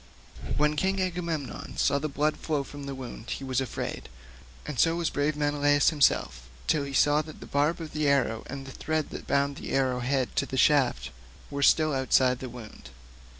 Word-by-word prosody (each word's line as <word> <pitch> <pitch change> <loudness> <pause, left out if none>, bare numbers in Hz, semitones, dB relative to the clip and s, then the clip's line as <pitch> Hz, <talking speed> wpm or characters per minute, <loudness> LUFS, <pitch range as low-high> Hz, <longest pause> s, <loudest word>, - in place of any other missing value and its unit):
When 150 +1 +2
King 190 +5 0
Agamemnon 170 -6 -3
saw 140 - +2
the 155 +2 -3
blood 150 +2 0
flowing 150 -3 -1
from 145 +1 -9
the 135 - -4
wound 120 -3 -8
he - - -4
was 130 -1 0
afraid, 130 - -5 0.6
and 145 -5 -5
so 165 0 +4
was 170 -1 -1
brave 145 +1 0
Menelaus 145 0 +3
himself 60 - +1 0.2
till 145 -2 +1
he 140 - -6
saw 145 +2 +4
that 155 0 -11
the - - -9
barbs 150 +4 0
of 160 -2 -6
the 150 -1 0
arrow 130 -5 +2
and 135 0 -7
the 135 - -8
thread 155 +2 -2
that - - -8
bound 140 0 +1
the - - -6
arrow 130 -2 +1
head 130 +1 -1
to - - +1
the 130 - -4
shaft 125 - +3 0.4
were 140 0 -3
still 155 +2 +4
outside 130 -1 +3
the 130 - -6
wound. 115 - -11
140 Hz, 195 wpm, -28 LUFS, 130-150 Hz, 0.6 s, so